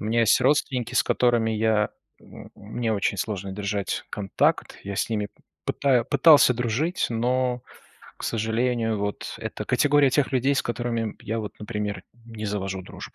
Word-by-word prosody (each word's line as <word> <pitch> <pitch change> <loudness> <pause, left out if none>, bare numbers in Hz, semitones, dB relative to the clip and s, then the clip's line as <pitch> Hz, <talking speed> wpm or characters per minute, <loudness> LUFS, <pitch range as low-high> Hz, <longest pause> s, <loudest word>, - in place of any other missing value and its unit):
У - - -5
меня 115 +2 +2
есть 115 +2 +4
родственники, 130 -2 +1
с 110 - +4
которыми 120 -2 +2
я 110 -1 +2 0.7
мне 110 +2 -3
очень 100 -1 0
сложно 100 -1 -3
держать 100 0 -3
контакт. 100 -2 0
Я 100 - -4
с 110 - -1
ними 105 -2 -1 0.4
пытаюсь 130 -4 +2
пытался 145 -3 +7
дружить, 125 - 0
но, 125 +1 0 0.6
к - - -7
сожалению, 115 0 0
вот 100 0 -4
это - - -5
категория 145 -2 +4
тех 140 +1 +1
людей, 135 +2 +2
с - - +1
которыми 115 -2 -2
я, 115 +2 -3
вот, 105 -3 -6
например, 105 -1 -4 0.2
не 110 -2 -6
завожу 95 -2 -3
дружбу. - - -10
115 Hz, 155 wpm, -25 LUFS, 105-125 Hz, 0.7 s, пытался